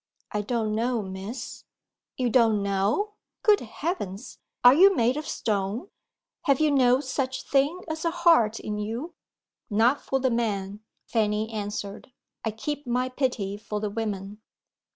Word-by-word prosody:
"I 210 - -1
don't 220 0 -1
know, 230 0 0
Miss." 195 +6 -7 0.5
"You 250 -2 0
don't 225 -4 +4
know? 200 - 0 0.3
Good 425 -2 +6
heavens, 240 - -5 0.2
are 245 +1 +10
you 385 +6 +7
made 240 0 +2
of 305 +1 -4
stone? 210 - -2 0.6
Have 275 -4 +3
you 310 -1 +3
no 255 -1 +4
such 260 -1 -2
thing 285 +6 +2
as 315 0 -4
a 335 - +2
heart 330 -11 +4
in 210 0 -4
you?" 235 +11 -4 0.6
"Not 230 +6 +3
for 270 - -1
the 260 -1 +1
men," 205 -4 -1 0.3
Fanny 215 -1 0
answered. 205 +1 -5 0.3
"I 225 - 0
keep 285 +6 -5
my 250 +1 0
pity 245 -7 -1
for 210 0 -4
the 210 -1 -3
women." 205 -1 -4
230 Hz, 150 wpm, -26 LUFS, 210-270 Hz, 0.6 s, are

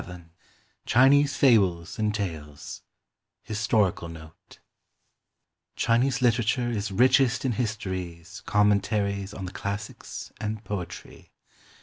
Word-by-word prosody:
VII 90 -2 -10 0.6
CHINESE 140 +3 +5
FABLES 95 -9 +3
AND 105 -1 0
TALES 80 -8 -6 0.6
HISTORICAL 105 -5 0
NOTE 80 -1 -13 1.2
Chinese 125 +3 +1
literature 120 +1 +2
is 105 -3 -3
richest 125 +4 +3
in 130 - +2
histories, 95 -6 -4
commentaries 100 -1 +1
on 95 -2 -7
the 90 - -6
classics, 100 +2 -6
and 110 0 -4
poetry. 90 -3 -7
105 Hz, 95 wpm, -26 LUFS, 90-115 Hz, 1.2 s, CHINESE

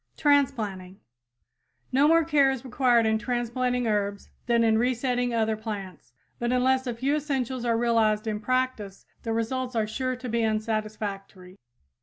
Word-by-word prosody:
TRANSPLANTING 210 -11 0 0.9
No 275 +3 +4
more 330 +1 +5
care 295 -4 +3
is 265 -1 -3
required 245 -2 +3
in 220 0 +2
transplanting 245 +1 -1
herbs 205 -2 -2 0.2
than 235 -1 +3
in 220 -1 +3
resetting 245 0 0
other 220 -1 +1
plants, 200 - -7 0.3
but 240 0 -1
unless 260 +1 +2
a 240 - -2
few 270 +5 0
essentials 260 -4 -2
are 230 -1 +2
realized 225 -2 +2
in 215 -1 -2
practice 255 -4 -2 0.2
the 230 - -4
results 245 +3 -2
are 220 -1 +1
sure 255 +4 -2
to 250 +1 -8
be 235 0 0
unsatisfactory. 215 -4 -3
235 Hz, 150 wpm, -26 LUFS, 215-255 Hz, 0.9 s, more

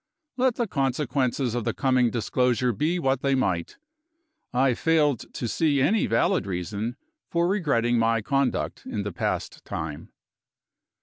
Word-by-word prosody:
let 255 -2 +2
the 235 - 0
consequences 135 - 0
of 120 -1 -1
the - - -2
coming 130 -3 +3
disclosure 125 +1 +1
be 155 - 0
what 135 -5 0
they 135 -1 +2
might, 90 -10 -1 0.7
I 130 +1 +3
failed 150 -3 +1
to 120 - -2
see 145 +3 +1
any 205 +11 +2
valid 195 - +1
reason 100 +6 -3 0.3
for 170 0 +1
regretting 130 - +1
my 115 -1 +2
conduct 135 +3 -1
in 105 - -3
the 105 -2 -4
past - - -3
time. 75 -2 -6
130 Hz, 140 wpm, -25 LUFS, 115-150 Hz, 0.7 s, coming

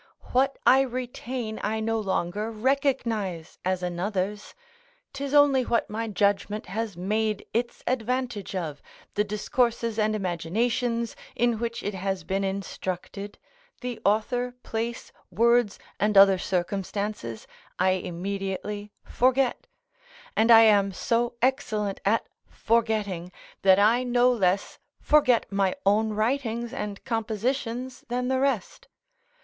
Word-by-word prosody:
What 270 +2 +2
I 265 +1 +7
retain 250 -3 -4
I 220 +2 -1
no 225 +1 0
longer 200 +1 -1
recognise 225 - -1
as 185 0 -1
another's; 190 +3 -3 0.6
'tis 280 0 -4
only 285 -2 +5
what 235 -3 0
my 225 +1 -2
judgment 205 0 0
has 215 -1 -4
made 215 +3 -1
its 235 +1 -2
advantage 245 -4 -2
of, 155 -6 -4 0.3
the 210 - +2
discourses 225 +2 0
and 215 0 +2
imaginations 225 +6 -1 0.2
in 240 -2 +1
which 230 0 -3
it 205 - -2
has 190 0 -3
been 195 +1 -1
instructed: 195 +1 -4 0.4
the 245 -3 -4
author, 245 +4 +1
place, 230 +1 -4 0.2
words, 230 +2 +3 0.2
and 210 0 +2
other 195 -1 +8
circumstances, 190 - -3 0.3
I 185 +1 +3
immediately 195 +3 -4
forget; 255 +1 +1 0.7
and 225 +2 +3
I 225 -1 +10
am 205 -3 +5
so 235 +5 0
excellent 215 -6 0
at 215 +3 +2 0.2
forgetting, 215 -6 0 0.3
that 190 -1 +6
I 220 +5 +4
no 245 0 +3
less 195 -4 0 0.2
forget 255 -6 +4
my 195 -1 +1
own 215 +3 +3
writings 235 +1 -1
and 205 +2 -5
compositions 240 +2 -2
than 250 +1 -1
the 260 0 +1
rest. 265 -7 -1
220 Hz, 120 wpm, -26 LUFS, 195-240 Hz, 0.7 s, I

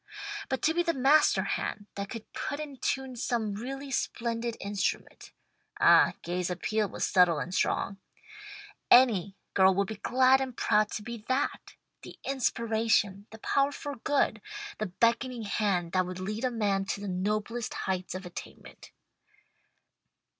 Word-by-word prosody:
But 265 - -2
to 320 - +3
be 345 - +2
the 335 -1 0
master 270 -6 +4
hand 205 +1 -3
that 200 0 -5
could 230 -3 -9
put 285 - -4
in 290 -3 -6
tune 265 +1 -2
some 230 -3 -1
really 270 +6 -6
splendid 235 -2 -2
instrument 200 -3 -3 0.5
(ah, - - +6
Gay's 180 +1 -2
appeal 210 +3 -1
was - - -2
subtle 180 -3 +4
and 175 +4 -4
strong) 195 +1 0 0.9
any 210 -7 +5 0.2
girl 190 -1 +5
would 200 +1 +2
be 220 - -6
glad 260 +4 +4
and 255 -2 -4
proud 210 0 +3
to 210 - -4
be 235 -1 -7
that: 260 +2 -1 0.3
the - - -11
inspiration, 225 -6 0
the 220 - -11
power 275 +5 +1
for 285 -1 -6
good, 275 +5 +1 0.4
the 215 - -1
beckoning 235 +5 0
hand 195 -5 0
that 185 0 +1
would 180 0 -6
lead 210 +6 -3
a - - +2
man 205 -5 0
to 195 - -3
the 205 - -6
noblest 210 +5 -2
heights 185 -1 -2
of 185 0 -6
attainment. 175 - -10
220 Hz, 155 wpm, -29 LUFS, 195-255 Hz, 0.9 s, ah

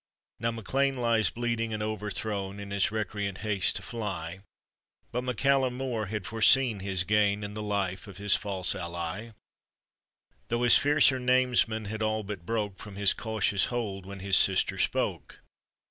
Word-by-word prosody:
Now 115 0 0
MacLean 135 +4 -1
lies 115 -3 +2
bleeding 115 -1 -2
and 105 - -3
overthrown 105 -2 -3
In 100 0 -8
his 100 -1 +2
recreant 105 -2 -3
haste 100 -4 +1
to 95 - -1
fly; 95 -6 -5 0.7
But 125 +1 -2
MacCallum 130 +1 +1
Mor 125 -5 -3
had 105 -1 -4
foreseen 115 0 +4
his 95 -2 -1
gain 105 +1 +1
In 100 0 -6
the 105 - -5
life 100 -2 -2
of 100 -3 -11
his 100 0 +1
false 95 -3 0
ally, 85 +6 -5 1.1
Though 120 +1 -1
his 120 - +7
fiercer 145 -2 +4
namesmen 125 -3 +2
had 110 +2 -5
all 110 0 0
but 100 -4 -8
broke 105 -4 -2
From 105 -2 -10
his 100 -1 +4
cautious 110 -3 +1
hold, 100 -6 -4
when 100 -1 -8
his 95 0 +4
sister 95 -1 +3
spoke. - - -2
105 Hz, 160 wpm, -28 LUFS, 100-115 Hz, 1.1 s, his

